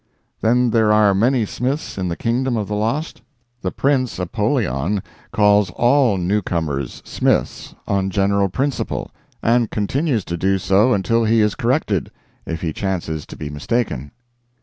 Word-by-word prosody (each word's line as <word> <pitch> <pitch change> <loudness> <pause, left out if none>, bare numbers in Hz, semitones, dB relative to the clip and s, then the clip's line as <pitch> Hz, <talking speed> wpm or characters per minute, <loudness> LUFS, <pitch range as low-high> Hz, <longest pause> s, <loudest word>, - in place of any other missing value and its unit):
"Then 120 +2 +3
there 110 -2 +3
are 105 -2 +5
many 115 +4 +2
Smiths 130 +8 -3
in 95 -2 -2
the 85 - -2
kingdom 120 +3 0
of 105 -2 -2
the 105 - -4
lost?" 115 +10 -2 0.4
"The 95 - -1
Prince 130 +2 0
Apollyon 90 0 -1 0.3
calls 105 -2 +4
all 120 -4 +3
newcomers 85 -8 -2
Smith - - -1
on 95 -1 0
general 100 0 +1
principles; 135 +8 -2 0.3
and 115 -1 +3
continues 120 - -1
to 85 - -3
do 95 +3 +1
so 100 +6 +3
until 115 +4 +1
he 115 +1 +3
is 105 -1 +2
corrected, 120 - 0 0.4
if 80 0 -4
he 80 -3 -2
chances 85 -6 -3
to - - -10
be 75 -1 -6
mistaken." 75 - -2
105 Hz, 150 wpm, -20 LUFS, 95-120 Hz, 0.4 s, are